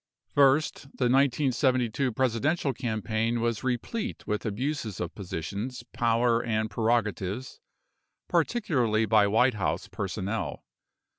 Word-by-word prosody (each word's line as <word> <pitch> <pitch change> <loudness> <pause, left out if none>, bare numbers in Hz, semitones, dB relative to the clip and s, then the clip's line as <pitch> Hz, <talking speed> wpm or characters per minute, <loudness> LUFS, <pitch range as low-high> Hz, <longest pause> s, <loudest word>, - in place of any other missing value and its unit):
First, 140 +2 +4 0.2
the 125 - +1
1972 130 -2 +2
Presidential 130 +5 +1
campaign 115 -1 -1
was 115 -2 -1
replete 170 - -3
with 105 +1 -2
abuses 115 - -3
of 90 - -3
positions, 100 +7 -5
power, 115 0 +2
and 110 -1 -1
prerogatives, 110 0 -1 0.7
particularly 140 - +1
by 110 -2 +4
White 125 +5 +4
House 100 -5 -2
personnel. 95 -3 -3
115 Hz, 100 wpm, -28 LUFS, 110-130 Hz, 0.7 s, First